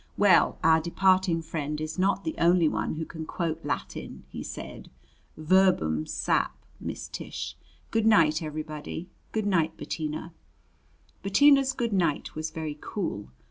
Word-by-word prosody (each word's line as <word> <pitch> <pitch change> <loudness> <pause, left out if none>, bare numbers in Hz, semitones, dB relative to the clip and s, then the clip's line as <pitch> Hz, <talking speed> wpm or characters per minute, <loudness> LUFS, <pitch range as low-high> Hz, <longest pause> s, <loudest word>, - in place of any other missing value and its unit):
"Well, 200 -3 +5
our 160 0 +5
departing 185 0 +2
friend 150 -2 -3
is 155 +3 -4
not 195 +2 +2
the 320 - -2
only 170 -1 +5
one 155 - -1
who 160 +1 -3
can 160 -1 -7
quote 165 -2 -3
Latin," 145 -2 -5
he - - -7
said. - - -8 0.5
"Verbum 155 - +3
sap., - - 0 0.2
Miss - - -5
Tish. - - -6 0.4
Good 225 -1 +2
night, 160 -7 +5
everybody. 155 +2 -6 0.2
Good 220 -2 -1
night, 165 -5 +1
Bettina." 155 +1 -4 0.9
Bettina's 275 +6 +5
good 235 -4 -2
night 170 -6 0
was 155 +1 -3
very 155 -2 -5
cool. 165 - -4
165 Hz, 140 wpm, -27 LUFS, 155-190 Hz, 0.9 s, Well